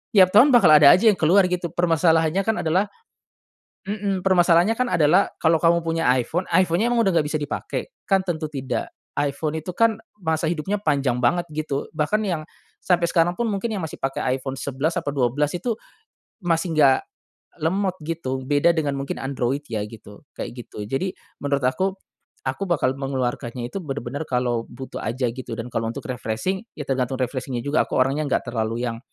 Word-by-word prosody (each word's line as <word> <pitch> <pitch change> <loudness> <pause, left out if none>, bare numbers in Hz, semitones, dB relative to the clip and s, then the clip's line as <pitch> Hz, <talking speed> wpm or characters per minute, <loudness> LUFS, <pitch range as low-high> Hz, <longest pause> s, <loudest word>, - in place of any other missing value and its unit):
tiap 185 -2 +7
tahun 250 +8 +8
bakal 200 -9 +6
ada 150 -2 +9
aja 220 +5 +5
yang 195 - +2
keluar 180 +5 +4
gitu 175 -1 -2
permasalahannya 165 +1 +3
kan 225 0 0
adalah 180 +6 +2 1.0
mhm, 200 -2 -2
permasalahannya 175 +2 +4
kan 255 0 +1
adalah 170 +4 +4
kalau 160 0 +4
kamu 170 0 +4
punya 165 0 0
iPhone, 170 +9 -1
iPhone-nya 185 +5 +3
emang 235 - +3
udah - - +4
nggak 155 - +3
bisa 155 +1 -1
dipake? 150 - -4
Kan 195 -1 +3
tentu 160 -3 -2
tidak. 130 -5 -3 0.3
iPhone 150 +2 -1
itu 175 +3 -6
kan 230 -2 +3 0.2
masa 160 -1 0
hidupnya 185 +5 -2
panjang 140 -8 0
banget 170 +9 +2
gitu 150 -2 -3
bahkan 185 +9 +1
yang, 175 -6 -1 0.4
sampe 175 -2 +1
sekarang 170 +1 +2
pun 235 -2 -1
mungkin 210 +3 -2
yang 190 -5 -3
masih 160 - -6
pake 135 0 -2
iPhone 130 +1 -2
11 140 +4 -2
apa - - -3
12 140 +2 +1
itu, 230 +6 -1 0.7
masih 170 0 0
nggak, 135 -3 +6 0.6
lemot 185 +3 0
gitu. 135 -6 -3
Beda 145 +5 +3
dengan 145 -4 -1
mungkin 135 - -3
Android 135 +1 -2
ya 110 - -1
gitu 105 0 -13
kayak - - -4
gitu. 105 - -8
Jadi 180 - -2 0.3
menurut 140 -1 0
aku, 185 +10 +1 0.5
aku 130 +9 -2
bakal 135 -6 +1
mengeluarkannya 125 -2 -3
itu 195 - -4
benar-benar 135 0 -4
kalo 120 -2 0
butuh 130 +2 -8
aja 125 +3 -1
gitu 130 -1 -7
dan 115 +2 -5
kalo 115 0 -1
untuk - - -7
refreshing 125 - -2
ya 150 - -4
tergantung 130 -1 0
refreshing-nya 125 -1 -3
juga 145 +2 +2
aku - - -4
orangnya 135 +4 +1
enggak - - 0
terlalu 115 +1 -2
yang, 115 -1 -4
155 Hz, 180 wpm, -23 LUFS, 130-180 Hz, 1.0 s, ada